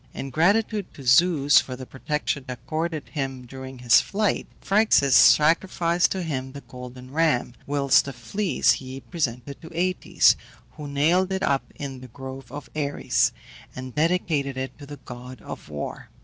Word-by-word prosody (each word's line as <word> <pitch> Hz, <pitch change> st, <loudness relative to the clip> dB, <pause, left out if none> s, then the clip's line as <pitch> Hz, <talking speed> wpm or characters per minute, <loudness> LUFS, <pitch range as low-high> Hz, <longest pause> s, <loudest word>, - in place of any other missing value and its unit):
In 135 Hz, -, -5 dB
gratitude 205 Hz, -, +1 dB
to 140 Hz, -, -10 dB
Zeus 145 Hz, +2 st, +5 dB
for 130 Hz, -, -7 dB
the 130 Hz, 0 st, -8 dB
protection 145 Hz, +2 st, -3 dB
accorded 155 Hz, +5 st, -4 dB
him 135 Hz, -4 st, -4 dB
during 130 Hz, +1 st, -9 dB
his 125 Hz, -1 st, +5 dB
flight, 210 Hz, 0 st, -1 dB
Phryxus 195 Hz, -, +3 dB
sacrificed 170 Hz, +2 st, +4 dB
to 190 Hz, -2 st, -3 dB
him 130 Hz, -5 st, -4 dB
the 140 Hz, -, -8 dB
golden 125 Hz, 0 st, -11 dB
ram, 150 Hz, -6 st, +1 dB
whilst 140 Hz, -1 st, +3 dB
the 140 Hz, -, -5 dB
fleece 145 Hz, -, +1 dB
he 130 Hz, 0 st, -4 dB
presented 140 Hz, -5 st, -4 dB
to 165 Hz, -, -10 dB
Aëtes, 180 Hz, +2 st, +2 dB, 0.4 s
who 150 Hz, -1 st, -8 dB
nailed 165 Hz, +7 st, +2 dB
it 190 Hz, 0 st, -1 dB
up 140 Hz, -1 st, 0 dB
in 135 Hz, -3 st, -7 dB
the 130 Hz, -, -10 dB
Grove 130 Hz, 0 st, -9 dB
of 145 Hz, -3 st, -8 dB
Ares, 145 Hz, -2 st, +1 dB, 0.4 s
and 130 Hz, -1 st, -7 dB
dedicated 155 Hz, -4 st, 0 dB
it 130 Hz, 0 st, -4 dB
to 140 Hz, -, -10 dB
the 145 Hz, 0 st, -8 dB
god 125 Hz, 0 st, -9 dB
of -, -, -9 dB
War. 75 Hz, -1 st, -6 dB
140 Hz, 160 wpm, -24 LUFS, 130-165 Hz, 0.4 s, Zeus